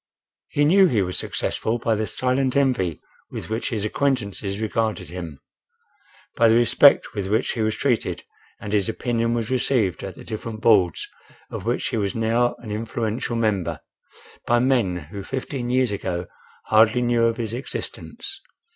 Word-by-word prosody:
He 145 - +2
knew 190 +5 +6
he 110 - +2
was 90 0 -4
successful 115 +2 -2
by 115 -1 0
the 110 0 -1
silent 130 0 0
envy 125 - +1 0.3
with - - -7
which 110 +2 -1
his 105 -4 -2
acquaintances 105 -6 -1
regarded 110 -3 -1
him; 85 -5 -7 1.0
by 115 -1 +5
the 110 - +5
respect 120 +4 +5
with 100 -4 -3
which 110 +5 +1
he 115 - -3
was 110 0 +1
treated 125 -5 0 0.4
and 105 -1 -6
his 100 -1 +2
opinion 115 0 0
was 115 0 -2
received 120 -8 +1
at 95 -3 -6
the - - -11
different 110 0 -6
Boards, 105 -7 +3 0.4
of - - -6
which - - 0
he - - -2
was 100 -2 -1
now 115 +2 +1
an 110 -3 -9
influential 115 +2 -2
member, 95 -9 0 0.7
by 120 - +4
men 120 -7 +2 0.2
who 100 - -6
fifteen 130 +1 -4
years 125 -2 +2
ago 90 -3 -3 0.4
hardly 110 +3 +4
knew 120 -1 +3
of 115 0 +1
his 115 -2 -3
existence. 390 - -5
115 Hz, 165 wpm, -23 LUFS, 105-120 Hz, 1.0 s, knew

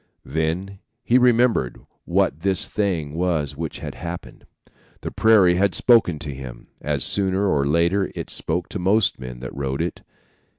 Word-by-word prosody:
"Then 80 +6 -2 0.2
he 125 +2 +4
remembered 120 - +2 0.3
what 70 - +1
this 95 +1 0
thing 85 -9 -2
was 80 -5 -1
which 80 +1 -5
had - - -6
happened. 85 0 -8 0.5
The - - -5
prairie 105 -5 +5
had 95 -2 +2
spoken 115 -9 +4
to 75 -1 -6
him, 65 -2 -10
as 75 -3 -1
sooner 95 0 +1
or 70 -6 +1
later 85 +6 +1
it - - -6
spoke 85 +2 -2
to 105 - -5
most 95 0 +2
men 60 -1 -8
that 65 - -7
rode 70 -1 -3
it. 85 - -5
85 Hz, 160 wpm, -22 LUFS, 75-100 Hz, 0.5 s, prairie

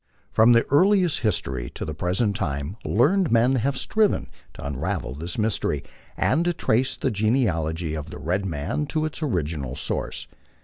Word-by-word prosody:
From 115 +2 +6
his 115 - +4
earliest 180 +1 +4
history 70 - -1
to - - -4
the 75 - -4
present 95 +7 0
time 70 0 -3
learned 165 - +2
men 120 +3 +4
have 130 +3 0
striven 215 - +1 0.2
to - - -8
unravel 70 -2 -3
this 85 +5 -5
mystery, 105 -10 0 0.3
and 160 +5 +2
to 175 - +2
trace 130 -4 +1
the - - 0
genealogy 90 - 0
of 75 -2 -5
the - - -8
red 90 +5 -1
man 85 - -2
to 155 +1 -1
its 155 +1 -5
original 75 - -2
source. 65 - -3
105 Hz, 165 wpm, -24 LUFS, -, 0.3 s, From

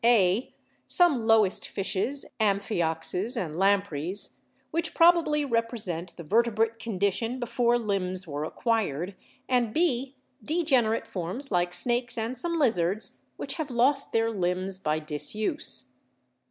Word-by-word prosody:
(a) 220 -2 +3 0.4
some 290 -11 +4
lowest 220 -4 +3
fishes, 200 +8 -2
amphi 200 -2 +1
oxus 175 +8 -1
and 160 -7 -3
lampreys, 195 -2 0 0.3
which 330 0 -2
probably 330 -3 +4
represent 230 -8 -2
the 170 - -7
verte 225 +6 +2
brate 225 +1 0
condition 225 +3 -1
before 240 0 +1
limbs 190 -5 -2
were 145 0 -4
acquired; 195 - -1 0.3
and 240 -3 +1
(b) 275 -5 0 0.3
degenerate 270 -9 +1
forms 190 +10 -4
like 175 -1 +1
snakes 240 +5 +1
and 225 +3 -2
some 335 +7 +3
lizards, 210 - +1 0.2
which - - -3
have 295 - -4
lost 265 +3 +2
their 225 0 +1
limbs 185 -1 -2
by 155 -4 0
disuse. 150 -4 -1
220 Hz, 125 wpm, -27 LUFS, 185-245 Hz, 0.4 s, some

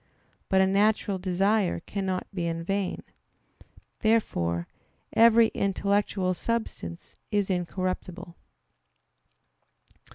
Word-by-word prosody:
But 190 0 +4
a - - +5
natural 200 0 +2
desire 195 +2 +1
cannot 190 0 -3
be 175 -3 -2
in 165 0 -3
vain. 195 +1 -2 1.0
Therefore 85 - +1 0.5
every 230 0 +6
intellectual 200 -1 0
substance 180 - -4 0.2
is 205 -2 0
incorruptible. 180 0 -3
190 Hz, 85 wpm, -27 LUFS, 180-205 Hz, 1.0 s, every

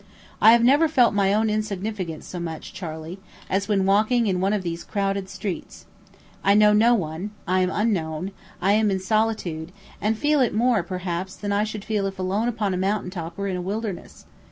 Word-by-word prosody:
I 220 - +8
have 235 0 +4
never 285 +6 +5
felt 250 -8 +4
my 200 -1 +2
own 215 +2 +2
insignificance 210 -5 -3
so 180 - -6
much, 165 0 -6
Charley, 165 -1 -7 0.3
as 195 +1 0
when 200 -3 +2
walking 215 +5 +3
in 185 -3 0
one 195 +1 +2
of 210 -3 0
these 170 -1 -4
crowded 195 -1 -2
streets. 190 -1 -6 0.6
I 200 - +4
know 210 0 +6
no 230 +3 +5
one; 170 0 -3 0.2
I 185 +1 +2
am 185 0 +2
unknown; 185 -4 -1 0.3
I 190 +3 +2
am 215 0 +3
in 190 -1 0
solitude, 190 -6 -1 0.3
and 215 +1 +1
feel 295 +2 +2
it 245 - +1
more, 235 -2 +3
perhaps, 180 0 -4
than 205 -1 -4
I 200 +1 +2
should 215 -1 -6
if 195 -3 -1
alone 190 +5 0
upon 215 -5 -1
a - - -1
mountain 190 0 -1
top 170 -2 -6
or 200 0 -2
in 190 - -2
a - - -3
wilderness. 200 +1 -5
200 Hz, 200 wpm, -24 LUFS, 185-215 Hz, 0.6 s, I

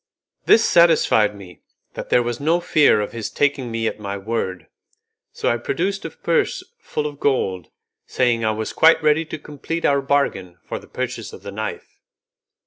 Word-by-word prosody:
This 230 - +6
satisfied 155 -11 +4
me 95 -3 -13 0.3
that - - -7
there 125 - +4
was 120 0 -3
no 160 +4 +2
fear 150 -10 +3
of 105 - -4
his 115 -2 -5
taking 140 -4 0
me 115 0 -2
at 110 - -2
my 100 -1 -4
word, 95 -3 -3 0.7
so - - -4
I 120 - +2
produced 185 +11 -2
a - - -3
purse 450 -3 -1 0.2
full 150 - -4
of 145 -1 -5
gold, 95 - 0 0.4
saying 120 -3 +1
I 110 - +2
was 110 0 -3
quite 160 0 +5
ready 155 +2 +3
to 155 - -6
complete 150 +3 -5
our 140 -1 +3
bargain 135 -11 -1
for - - -5
the - - -17
purchase - - -5
of - - -12
the 100 - -7
knife. 110 +2 -6
125 Hz, 180 wpm, -21 LUFS, 105-155 Hz, 0.7 s, This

